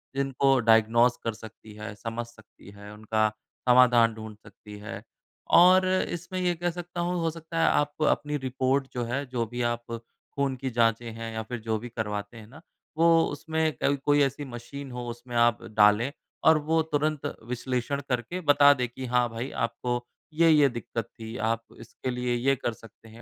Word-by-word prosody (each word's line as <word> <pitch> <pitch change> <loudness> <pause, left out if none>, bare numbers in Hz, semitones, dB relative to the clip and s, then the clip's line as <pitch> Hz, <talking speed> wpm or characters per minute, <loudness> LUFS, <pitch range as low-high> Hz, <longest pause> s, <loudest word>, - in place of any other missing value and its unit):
जिनको 135 0 +2
डायग्नोज़ 115 +1 +4
कर 115 - -1
सकती 110 0 -13
है, 105 +1 -7
समझ 115 +2 -5
सकती 110 -4 -18
है, 100 0 -12
उनका 110 0 0 0.4
समाधान 120 -2 +6
ढूँढ 110 -1 -9
सकती 105 -1 -13
है 105 -1 -8 0.5
और 185 +2 +7
इसमें 185 -1 -2
ये 180 -1 +1
कह 175 +1 -1
सकता 175 0 -6
हूँ 175 +1 -1
हो 165 - +1
सकता 165 0 -8
है 165 - +4
आप 145 +1 0
अपनी 150 0 0
रिपोर्ट 130 0 0
जो 120 -1 -2
है, 135 +5 -2
जो 125 -3 -2
भी 120 +2 -5
आप 120 0 -1 0.5
खून 140 -1 -1
की 130 +1 -4
जाँचें 115 -1 +1
हैं 115 0 -7
या 110 0 -3
फिर 120 +2 -6
जो 110 0 -2
भी 120 +3 -8
करवाते 105 -1 -4
हैं 110 -1 -12
ना 145 +7 -15 0.4
वो 165 +1 +4 0.2
उसमें 160 +2 -1
कभी 140 - +2
कोई 145 0 +4
ऐसी 140 +1 -2
मशीन 130 +3 -8
हो 125 0 -5
उसमें 120 +1 -8
आप 120 -1 +3 0.2
डालें 105 +5 +5 0.4
और 160 -1 +7
वो 160 0 +3
तुरंत 150 0 0 0.2
विश्लेषण 125 +2 -2
करके 125 +8 -2
बता 145 -2 +6
दें 125 -2 -2
कि, 130 +2 -7
हाँ 125 -1 +1
भाई 115 +4 -5
आपको 120 +1 -2 0.3
ये-ये 155 -3 +5
दिक्कत 120 -1 -5
थी, 110 +1 -7
आप 115 +1 -1 0.2
इसके 130 - -7
लिए 125 0 -1
ये 135 +3 +2
कर 120 -3 -3
सकते 115 0 -17
हैं। 115 +2 -14
125 Hz, 185 wpm, -27 LUFS, 115-145 Hz, 0.5 s, और